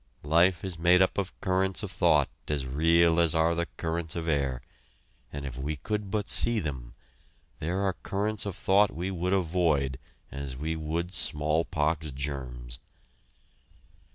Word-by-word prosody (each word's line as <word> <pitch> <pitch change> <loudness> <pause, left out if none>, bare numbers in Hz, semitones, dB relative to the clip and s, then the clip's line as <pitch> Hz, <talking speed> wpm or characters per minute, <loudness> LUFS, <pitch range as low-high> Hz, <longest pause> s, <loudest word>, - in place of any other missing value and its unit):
Life 85 +4 +3
is 90 -4 -5
made 90 +2 +5
up 95 +1 +2
of 95 -2 -4
currents 95 0 0
of - - -4
thought - - +3 0.2
as 75 -3 -1
real 80 +5 +3
as 85 -1 +3
are 80 +1 +3
the 85 0 -1
currents 80 0 -2
of 85 -1 -3
air, 70 -5 0 0.7
and 70 -1 -6
if 65 -2 -6
we 75 +3 -2
could 105 +8 -3
but 105 0 -1
see 115 -1 +2
them, 65 -8 -5 0.6
there 90 +5 -1
are 95 -1 +1
currents 105 +3 -2
of 95 - -4
thought 100 +2 +4
we 90 +4 -4
would 90 0 -2
avoid 80 -8 +1 0.3
as 70 -2 -5
we 80 +4 -2
would 80 +3 -3
smallpox 75 0 0
germs. 65 -4 -5
80 Hz, 155 wpm, -28 LUFS, 70-90 Hz, 0.7 s, made